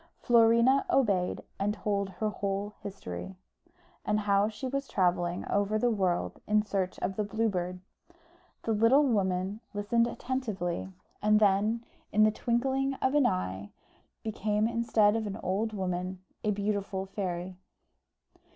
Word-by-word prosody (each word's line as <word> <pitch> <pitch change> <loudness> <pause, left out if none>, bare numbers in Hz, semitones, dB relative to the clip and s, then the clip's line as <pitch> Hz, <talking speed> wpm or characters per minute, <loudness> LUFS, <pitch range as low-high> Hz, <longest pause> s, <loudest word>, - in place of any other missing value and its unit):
Florina 235 +3 +5
obeyed, 200 -9 +1 0.2
and 205 +2 0
told 200 -2 -1
her 215 +4 -2
whole 200 0 -3
history, 190 - -7 0.7
and 210 0 +1
how 200 0 +3
she 220 +4 -7
was 275 +1 -2
travelling 175 -2 0
over 205 +1 +1
the 240 +2 +2
world 185 -5 -1
in 210 0 +3
search 190 -3 -2
of 190 - -2
the 210 - +1
Blue 220 +3 0
Bird. 180 -2 -3 0.8
The 225 - -1
little 230 +7 +5
woman 190 -2 0 0.2
listened 230 +3 +2
attentively, 215 -9 -3 0.3
and 210 0 +4
then, 215 +3 +2 0.3
in 215 - +4
the 215 - +5
twinkling 265 +4 0
of 260 0 0
an 295 -3 +5
eye, 95 +2 -2 0.5
became, 215 0 0
instead 230 -2 +3
of 220 -1 -1
an 200 0 -4
old 205 +5 0
woman, 185 -2 -3 0.2
a 215 - +1
beautiful 200 -1 -1
fairy. 185 -2 -4
205 Hz, 140 wpm, -29 LUFS, 190-225 Hz, 0.8 s, Florina